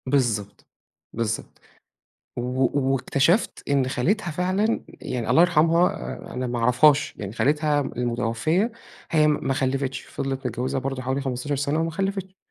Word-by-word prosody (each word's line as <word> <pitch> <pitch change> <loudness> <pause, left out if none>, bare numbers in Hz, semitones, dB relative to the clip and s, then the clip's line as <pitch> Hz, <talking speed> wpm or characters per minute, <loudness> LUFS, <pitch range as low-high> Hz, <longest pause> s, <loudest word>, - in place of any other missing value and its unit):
بالضبط، 120 -7 -1 0.5
بالضبط، 115 -1 -3 0.8
و - - -2 0.5
واكتشفت 140 - +1
إن 140 -2 +2
خالتها 175 - 0
فعلًا، 185 +7 0
يعني 125 -3 -4
الله 165 - +6
يرحمها 170 0 +2 0.2
أنا 125 0 -2
ما 120 0 -2
أعرفهاش، 135 +5 +4
يعني 100 -1 -6
خالتها 150 +4 +2
م - - -5
المتوفية، 125 - 0 0.4
هي 155 -2 +4
م 150 -2 0
ما 135 - +1
خلّفِتش 135 0 -1
فِضلِت 135 -1 -4
متجوّزة 125 +2 -2
برضو 135 0 -3
حوالي 130 +2 -1
15 135 +2 -2
سنة 145 +3 0
وما 165 0 0
خلّفِتش، 195 +1 -3
135 Hz, 140 wpm, -24 LUFS, 125-160 Hz, 0.8 s, الله